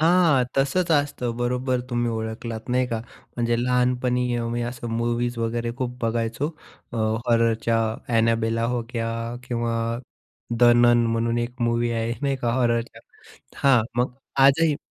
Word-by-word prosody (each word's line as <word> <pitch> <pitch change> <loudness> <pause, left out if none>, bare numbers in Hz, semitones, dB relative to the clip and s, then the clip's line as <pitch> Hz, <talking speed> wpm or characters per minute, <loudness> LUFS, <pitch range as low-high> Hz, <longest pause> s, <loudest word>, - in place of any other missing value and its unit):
हां, 165 -5 +4
तसंच 165 +6 +1
असतं, 145 -5 0
बरोबर 125 +1 0
तुम्ही 120 -1 0
ओळखलात, 110 +1 -5
नाही 125 +1 +2
का. 115 -2 -3 0.4
म्हणजे 120 -1 +1
लहानपणी 125 0 +1
अ, 120 - -2
मी 120 +1 -2
असं 120 0 -5
मूव्हीज 120 +1 -1
वगैरे 115 +1 -1
खूप 125 -1 -3
बघायचो, 115 +4 -1 0.4
अ, 120 - -4 0.3
हॉररच्या 115 -1 +2 0.4
एनाबेला 115 0 +2
होक्या 115 -1 -3 0.4
किंवा 120 -1 -1 0.8
द - - 0
नन 120 0 +5
म्हणून 115 +1 0
एक 120 +1 -4
मूव्ही 120 0 +1
आहे, 115 0 -1
नाही 140 -1 +1
का, 120 -3 -1
हॉररच्या 120 -2 0 0.6
हां, 135 -4 +5
मग 125 +1 +1 0.3
आजही 150 +2 +4
120 Hz, 135 wpm, -24 LUFS, 115-125 Hz, 0.8 s, नन